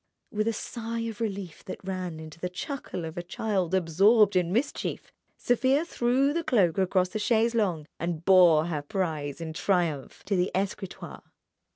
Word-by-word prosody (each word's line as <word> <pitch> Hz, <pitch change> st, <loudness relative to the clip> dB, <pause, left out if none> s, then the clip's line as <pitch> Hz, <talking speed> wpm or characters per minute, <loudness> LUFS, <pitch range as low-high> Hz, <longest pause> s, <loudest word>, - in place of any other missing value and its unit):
With 215 Hz, +1 st, -1 dB
a -, -, +3 dB
sigh 230 Hz, +1 st, -4 dB
of 230 Hz, -1 st, -5 dB
relief 195 Hz, -6 st, -4 dB
that 185 Hz, -, -7 dB
ran 185 Hz, -4 st, -4 dB
into 155 Hz, 0 st, -10 dB
the 180 Hz, -, -3 dB
chuckle 180 Hz, -, -5 dB
of 160 Hz, +2 st, -5 dB
a -, -, -2 dB
child 190 Hz, 0 st, -1 dB
absorbed 195 Hz, +4 st, +4 dB
in 180 Hz, -1 st, +2 dB
mischief, 250 Hz, +8 st, -2 dB, 0.3 s
Sofia 265 Hz, +5 st, +2 dB
threw 265 Hz, -1 st, +1 dB
the 335 Hz, +1 st, -1 dB
cloak 195 Hz, -, +2 dB
across 185 Hz, -1 st, +1 dB
a 215 Hz, -, -1 dB
chaise 230 Hz, +1 st, +2 dB
longue, 185 Hz, -9 st, 0 dB
and 170 Hz, -1 st, -3 dB
bore 175 Hz, -5 st, +6 dB
her 160 Hz, -4 st, -2 dB
prize 150 Hz, -3 st, -3 dB
in 160 Hz, -1 st, -5 dB
triumph 170 Hz, -6 st, -1 dB
to 200 Hz, -, 0 dB
the 180 Hz, 0 st, +1 dB
escritoire. 195 Hz, 0 st, -4 dB
190 Hz, 170 wpm, -27 LUFS, 170-225 Hz, 0.3 s, bore